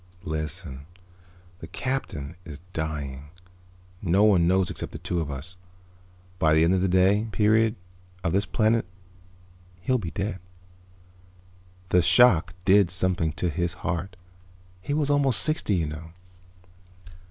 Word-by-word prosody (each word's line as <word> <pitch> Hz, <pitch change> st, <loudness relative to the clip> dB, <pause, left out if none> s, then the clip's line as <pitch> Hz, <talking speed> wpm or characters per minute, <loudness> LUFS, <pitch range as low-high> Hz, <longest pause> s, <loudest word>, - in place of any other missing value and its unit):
"Listen. 80 Hz, -2 st, -5 dB, 0.7 s
The 80 Hz, -, -9 dB
Captain 90 Hz, -, -4 dB
is 75 Hz, -4 st, -9 dB
dying. 75 Hz, -3 st, -4 dB, 0.8 s
No 95 Hz, +2 st, +2 dB
one 95 Hz, -6 st, +4 dB
knows 95 Hz, -1 st, +2 dB
except -, -, -6 dB
the -, -, -5 dB
two 85 Hz, -1 st, -2 dB
of 75 Hz, -, -4 dB
us. 70 Hz, +6 st, -7 dB, 0.8 s
By 80 Hz, -1 st, +3 dB
the 80 Hz, -, +4 dB
end 85 Hz, +3 st, +3 dB
of 95 Hz, -, +1 dB
the 95 Hz, -, +2 dB
day 95 Hz, +4 st, +3 dB
period 110 Hz, +1 st, +3 dB, 0.5 s
of 85 Hz, -1 st, 0 dB
this 100 Hz, 0 st, +1 dB
planet 110 Hz, -1 st, +1 dB, 0.9 s
he'll 130 Hz, +6 st, +1 dB
be 90 Hz, -6 st, -5 dB
dead. 95 Hz, +2 st, -4 dB, 1.5 s
The 90 Hz, -, +4 dB
shock 90 Hz, -2 st, +5 dB
did 100 Hz, -1 st, +5 dB
something 90 Hz, -3 st, +1 dB
to 85 Hz, +2 st, -2 dB
his 85 Hz, +1 st, -2 dB
heart. 90 Hz, +1 st, -3 dB, 0.7 s
He 145 Hz, +9 st, -2 dB
was 145 Hz, -2 st, +1 dB
almost 140 Hz, -4 st, +3 dB
sixty, 155 Hz, -, 0 dB
you 85 Hz, -3 st, 0 dB
know." 75 Hz, +2 st, -8 dB
90 Hz, 135 wpm, -25 LUFS, 80-105 Hz, 1.5 s, shock